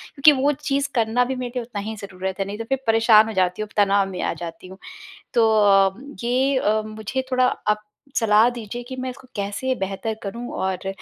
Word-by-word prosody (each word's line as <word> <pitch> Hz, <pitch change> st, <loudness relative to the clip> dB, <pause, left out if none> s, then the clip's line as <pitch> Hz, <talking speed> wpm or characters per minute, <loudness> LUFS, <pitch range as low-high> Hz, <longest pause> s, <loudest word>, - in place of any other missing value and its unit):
क्योंकि 285 Hz, +2 st, +7 dB
वो 285 Hz, +2 st, +4 dB, 0.2 s
चीज़ 280 Hz, 0 st, +1 dB
करना 235 Hz, +1 st, +2 dB
भी 260 Hz, +1 st, -3 dB
मेरे 250 Hz, -1 st, -4 dB
लिए 250 Hz, -, -1 dB
उतना 225 Hz, -3 st, -6 dB
ही 220 Hz, -, -5 dB
ज़रूरत 190 Hz, -2 st, -6 dB
है, 195 Hz, -, 0 dB
नहीं 200 Hz, +1 st, -6 dB
तो 230 Hz, -, -4 dB
फिर 270 Hz, -1 st, +1 dB
परेशान 225 Hz, -1 st, +6 dB
हो 225 Hz, -, -4 dB
जाती 185 Hz, 0 st, +1 dB
हूँ, 215 Hz, -, -4 dB
तनाव 200 Hz, -1 st, +3 dB
में 185 Hz, -2 st, -5 dB
आ -, -, 0 dB
जाती 170 Hz, +2 st, -8 dB
हूँ। 190 Hz, +1 st, -11 dB, 0.6 s
तो 230 Hz, -2 st, +4 dB, 0.2 s
अम 195 Hz, +8 st, +2 dB
ये 260 Hz, +3 st, +2 dB
अ, 215 Hz, -3 st, +2 dB
मुझे 215 Hz, +4 st, -4 dB
थोड़ा 255 Hz, 0 st, +3 dB
आप 210 Hz, -3 st, -1 dB, 0.3 s
सलाह 220 Hz, 0 st, +4 dB
दीजिए 240 Hz, -1 st, -6 dB
कि 260 Hz, -, -6 dB
मैं 255 Hz, 0 st, -3 dB
इसको 260 Hz, +1 st, -11 dB
कैसे 205 Hz, +6 st, -2 dB
बेहतर 195 Hz, +3 st, -3 dB
करूँ? 235 Hz, +4 st, -5 dB
और 190 Hz, 0 st, -2 dB
220 Hz, 215 wpm, -22 LUFS, 200-250 Hz, 0.6 s, क्योंकि